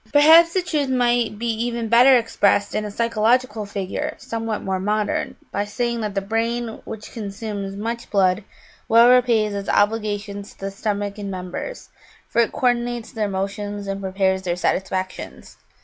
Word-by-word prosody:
Perhaps 325 +4 +7
the 370 - +2
truth 300 -6 -1
might 240 -3 +1
be 235 - -4
even 235 0 -1
better 250 +3 +7
expressed 205 -3 +1
in 215 - -1
a - - -4
physiological 230 0 +1
figure 195 -2 -4
somewhat 225 -1 -4
more 190 -1 -1
modern, 210 +2 -1 0.2
by 200 - -1
saying 235 +3 -2
that 210 -2 -3
the 195 - +1
brain, 225 +2 -2
which 220 -1 -8
consumes 200 -2 -5
much 230 +3 -4
blood, 190 0 +2 0.5
well 235 +2 +7
repays 230 -4 +3
its 200 0 -4
obligations 205 -1 0
to - - -30
the 195 0 -4
stomach 205 0 -3
and 200 -1 -5
members, 185 - -6 0.4
for 235 - +2
it 230 - +1
co 250 - +2
ordinates 240 -1 -3
their 215 -2 -1
motions 200 +1 -4
and 195 0 -4
prepares 190 0 0
their 175 -2 -2
satisfactions. 185 +1 -3
215 Hz, 165 wpm, -22 LUFS, 200-235 Hz, 0.5 s, Perhaps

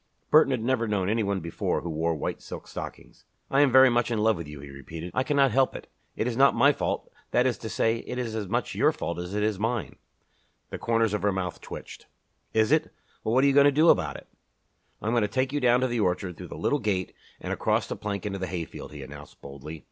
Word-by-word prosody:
Burton 155 -2 +7
had 130 -4 -1
never 120 -2 +1
known 100 -3 0
any 110 +2 +1
one 100 -2 -1
before 85 0 -2
who 85 - -5
wore 80 +1 0
white 75 - -4
silk - - -9
stockings. - - -9 0.3
"I 135 - +4
am 145 -3 +4
very 130 +1 +8
much 120 0 +1
in 115 - -1
love 110 +1 +3
with 85 -3 -7
you," 75 -1 -9
he 70 0 -10
repeated. 80 +5 -8
"I - - +1
cannot 140 -1 +3
help 130 +3 +2
it. - - -7 0.3
It - - -1
is 120 -1 -1
not 135 +2 +5
my 145 +1 +5
fault - - -3 0.2
that 125 - +2
is 130 -2 +2
to 110 - -6
say, 115 +1 +1
it 125 - -6
is 120 -3 -3
as 105 -3 -3
much - - -1
your - - +3
fault 85 - -4
as 90 +3 -5
it 105 - 0
is 105 -3 0
mine." 115 +1 -2 0.7
The - - -5
corners 115 -2 +1
of 105 - -1
her 105 - +2
mouth 95 -2 -4
twitched. - - -9 0.4
"Is 110 +2 +2
it? 155 0 +2 0.3
Well, 110 - 0
what 130 - +5
are - - +5
you 140 - +4
going 140 0 +6
to 145 - +6
do 155 +4 +4
about 85 -6 +3
it?" - - -14 0.8
"I - - -5
am 110 - +1
going 120 - +3
to 105 - +2
take 130 +4 -1
you 145 - +1
down 125 -1 +4
to 130 - +2
the 120 -1 -2
orchard, 90 -2 0
through - - -9
the - - -8
little 145 - +1
gate, 100 -5 -1 0.3
and - - -3
across - - +1
the - - -5
plank 100 -2 -4
into 100 -1 -3
the 95 - -3
hayfield," 85 -3 -6
he 75 -2 -8
announced, 75 +2 -12
boldly. 70 +3 -9
110 Hz, 260 wpm, -27 LUFS, 90-130 Hz, 0.8 s, very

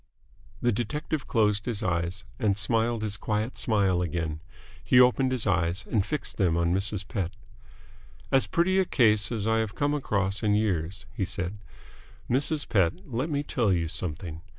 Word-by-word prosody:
The 120 - +4
detective 145 +6 -3
closed 105 -1 +1
his 115 -2 -2
eyes, 90 0 -1 0.2
and 100 -3 +1
smiled 115 +2 +1
his 105 -2 -2
quiet 110 +5 -2
smile 100 -5 +2
again. 80 -2 -2 0.4
He 125 - +5
opened 125 +1 +4
his 125 -3 +1
eyes, 90 -1 0
and 105 -4 +2
fixed 145 +8 -3
them 90 -5 +2
on 85 0 +2
Mrs. 100 +1 0
Pett. 95 -4 -3 1.0
"As 135 -1 +3
pretty 185 +3 +2
a 190 - +3
case 110 - +3
as 110 -3 -2
I 115 0 +2
have 110 -1 -2
come 145 0 +1
across 100 -8 -1
in 105 -2 +2
years," 95 -4 -1
he - - -1
said. 95 +2 -3 0.7
"Mrs. 145 +4 0
Pett, 90 -6 +3 0.2
let 130 +8 -1
me 145 -1 -1
tell 120 -7 +1
you 85 -3 +1
something. 80 -1 -4
105 Hz, 170 wpm, -27 LUFS, 90-120 Hz, 1.0 s, He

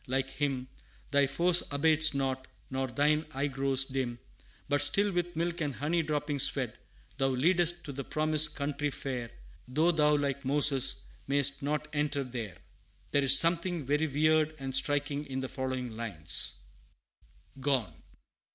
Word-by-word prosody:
like 135 +1 -1
him 135 -2 -2 0.4
Thy 140 -1 +3
force 170 +6 +3
abates 155 +1 +4
not, 130 -1 -2 0.2
nor 130 0 -2
thine 150 +5 +1
eye 135 +2 0
grows 135 -1 +1
dim; 130 -3 -3 0.5
But 145 0 +1
still 200 +8 +3
with 175 -1 -2
milk 170 +1 -2
and 145 -4 -2
honey 165 +4 0
droppings 150 -2 0
fed, - - -4 0.4
Thou 135 - +2
leadest 170 +6 +2
to 145 - -5
the 140 0 -6
Promised 155 +1 +1
Country 145 0 -2
fair, 125 -4 -5 0.4
Though 155 +7 +2
thou, 150 -2 +3
like 140 -1 -2
Moses, 135 -1 +3 0.2
may'st 140 0 +3
not 150 +2 -2
enter 145 -1 0
there 120 -6 -7 0.5
There 140 - +2
is 135 - +8
something 170 -1 +1
very 150 +4 +1
weird 155 +2 +2
and 135 -2 -5
striking 145 +1 0
in 130 -1 -4
the 130 - -5
following 130 -3 -4
lines: 90 -9 -1 1.0
GONE. 130 -4 0
140 Hz, 150 wpm, -30 LUFS, 130-155 Hz, 1.0 s, is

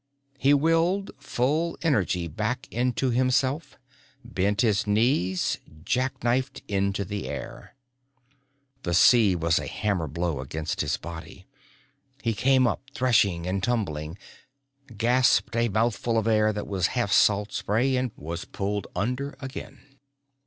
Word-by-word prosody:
He 135 - +4
willed 165 +6 +2
full 145 +5 -1
energy 95 - +1
back 110 - -3
into 125 +1 0
himself, 130 +4 0 0.5
bent 100 -2 0
his 110 -3 +2
knees, 105 -4 +1 0.3
jack 130 +1 -1
knifed 125 +3 0
into 100 0 0
the 100 +2 -5
air. - - -8 1.1
The 85 -1 -1
sea 105 0 +6
was 85 -1 +1
a - - -5
hammer 100 -6 -1
blow 85 0 -2
against 75 +3 -3
his 75 0 0
body. 85 +2 -9 0.8
He 115 -1 +1
came 130 +3 +3
up 120 - 0
threshing 100 -9 +2
and 95 +1 -1
tumbling, 95 -8 -2 0.8
gasped 120 +2 +3
a 115 0 +2
mouthful 115 +2 0
of 110 - +1
air 110 -1 +3
that 105 -1 -4
was 95 -4 0
half 120 -4 0
salt 105 0 +3
spray, 125 +6 0
was 85 +3 -6
pulled 100 +1 -3
under 125 +6 -2
again. 135 0 -9
110 Hz, 130 wpm, -26 LUFS, 95-130 Hz, 1.1 s, sea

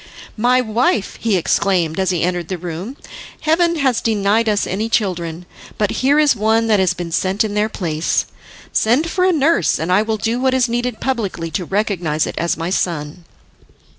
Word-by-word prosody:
"My 250 +3 +3
wife," 220 -3 0
he 220 -4 +2
exclaimed 175 -1 +1
as 190 -1 +1
he 175 -3 0
entered 175 -1 -1
the 185 - -3
room, 180 - -6 0.4
"heaven 340 +2 +2
has 265 -6 +1
denied 220 +1 +1
us 210 -1 +1
any 215 +4 -2
children, 175 -6 -1 0.3
but 210 -2 0
here 275 +3 +3
is 300 -4 +4
one 220 +1 +2
that 215 -3 +3
has 185 -2 +2
been 175 -2 -5
sent 190 +5 +1
in 215 -2 -3
their 210 +1 +1
place. 165 -6 -1 0.5
Send 270 +9 +2
for 365 -1 +1
a 375 - +4
nurse, 325 0 +2
and 165 +3 -2
I 190 +3 +4
will 220 0 -1
do 225 +4 -1
what 260 0 +2
is 255 -1 +3
needful 240 0 -2
publicly 200 -10 -2
to 180 0 -2
recognise 180 -6 -1
it - - -5
as 170 +1 0
my 165 +2 -3
son." 165 -2 -2
210 Hz, 190 wpm, -18 LUFS, 180-240 Hz, 0.5 s, is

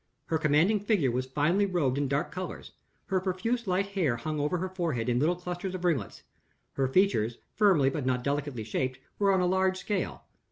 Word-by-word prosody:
Her 160 - 0
commanding 160 +8 +3
figure 200 - +1
was 130 +2 -2
finely 155 +9 +2
robed 160 -9 +1
in 145 - 0
dark 140 +2 -1
colors; 185 +1 -6 0.3
her 190 -2 +1
profuse 205 +5 -1
light 190 +2 +1
hair 180 -11 +1
hung 150 +6 -3
over 150 +5 0
her 185 +2 -3
forehead 165 -11 -2
in 120 0 +2
little 160 +6 +2
clusters 180 +1 -5
of 180 -1 -4
ringlets; 145 - -1 0.5
her 135 -1 +1
features, 130 - +2 0.2
firmly 180 -11 +4
but 145 0 -3
not 125 -1 0
delicately 140 -4 -2
shaped, 130 +4 -2 0.2
were 200 -1 +4
on 190 -1 +3
a - - +2
large 190 +1 +2
scale. 200 0 -3
170 Hz, 195 wpm, -29 LUFS, 135-190 Hz, 0.5 s, firmly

